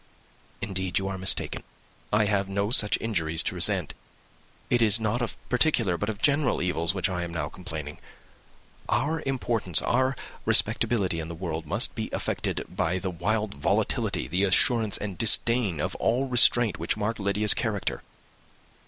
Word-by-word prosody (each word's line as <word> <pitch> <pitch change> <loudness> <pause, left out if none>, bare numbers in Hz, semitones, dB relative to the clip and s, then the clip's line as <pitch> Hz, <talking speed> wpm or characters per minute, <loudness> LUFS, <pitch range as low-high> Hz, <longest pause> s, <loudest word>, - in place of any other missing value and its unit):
"Indeed, 95 -2 -2
you 95 - -1
are 95 - -4
mistaken. 95 +1 0 0.5
I 105 0 +3
have 100 -1 0
no 100 +2 -1
such 105 -4 +2
injuries 85 -8 0
to - - -1
resent. - - +3 0.8
It 120 - +3
is 110 -1 +4
not 110 +2 -1
of 120 - -2
peculiar, 125 - +1
but 105 +5 -3
of 105 -2 -6
general 145 -2 +2
evils, 90 +1 0
which 95 - +1
I 90 -2 -3
am 85 -1 -5
now 80 -3 -3
complaining. 80 -5 -8 0.9
Our 150 +7 0
importance, 115 -10 +3
our 130 +2 0 0.3
respectability 105 -7 +1
in 80 - -5
the 85 - -7
world, 80 -2 -5
must - - -1
be - - -5
affected - - -3
by 90 +3 -2
the 95 0 -4
wild 105 +5 -2
volatility, 70 -2 -1
the 90 +7 -1
assurance 110 +3 +3
and 100 -4 -6
disdain 110 -4 +2
of - - -2
all 125 +4 0
restraint 120 -6 +4
which 85 +5 0
mark 110 +2 -2
Lydia's 105 +1 +2
character. 105 -4 -2
100 Hz, 160 wpm, -26 LUFS, 90-115 Hz, 0.9 s, is